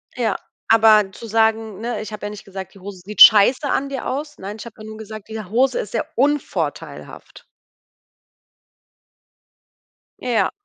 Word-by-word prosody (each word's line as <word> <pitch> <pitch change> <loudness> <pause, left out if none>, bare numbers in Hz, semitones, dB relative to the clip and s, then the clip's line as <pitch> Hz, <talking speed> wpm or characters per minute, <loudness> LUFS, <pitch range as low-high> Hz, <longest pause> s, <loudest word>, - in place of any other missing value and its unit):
Ja, 225 -5 -1 0.3
aber 220 -3 +5
zu 230 +4 -10
sagen 220 -1 0
ne, 235 -2 -3
ich 215 - -8
habe 205 - -7
ja 205 - -3
nicht 210 0 -10
gesagt 190 -1 -8
die 195 - -16
Hose 190 -1 -10
sieht 210 +1 -3
scheiße 245 +6 +7
an 275 +1 -1
dir 270 -2 -5
aus. 295 +3 -4
Nein, 205 +3 -7
ich - - -8
habe 230 - -11
ja - - -10
nur 220 0 -9
gesagt, 215 -1 -10
diese 220 -4 -7
Hose 255 +3 +1
ist 205 - -5
sehr 225 - -2
unvorteilhaft. 285 +3 -3 2.8
Ja. 240 -3 +1
220 Hz, 165 wpm, -20 LUFS, 205-240 Hz, 2.8 s, scheiße